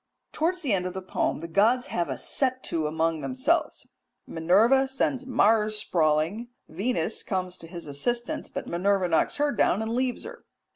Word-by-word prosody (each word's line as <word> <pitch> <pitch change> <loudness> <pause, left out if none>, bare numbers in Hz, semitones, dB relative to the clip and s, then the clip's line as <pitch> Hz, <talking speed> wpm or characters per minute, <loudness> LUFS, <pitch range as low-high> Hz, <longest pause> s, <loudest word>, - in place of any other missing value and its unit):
Towards 350 +3 -1
the 255 -7 +1
end 180 -2 0
of 185 - -7
the 190 - -4
poem 185 - -1
the 165 - -5
gods 225 +8 +3
have 175 - -1
a - - -3
set 260 -1 -1
to 160 -2 -1
among 160 0 0
themselves. 280 +6 0 0.4
Minerva 215 +12 +3
sends 265 0 -1
Mars 215 -3 +3
sprawling, 165 +4 0 0.2
Venus 195 +2 -1
comes 185 -2 -3
to 165 - -10
his 170 0 -7
assistance, 235 +13 -3
but - - -5
Minerva 190 +2 +1
knocks 165 - +1
her 290 0 +1
down 205 -4 +2
and 220 +1 -2
leaves 250 0 -1
her. 475 +2 -10
210 Hz, 175 wpm, -26 LUFS, 170-255 Hz, 0.4 s, gods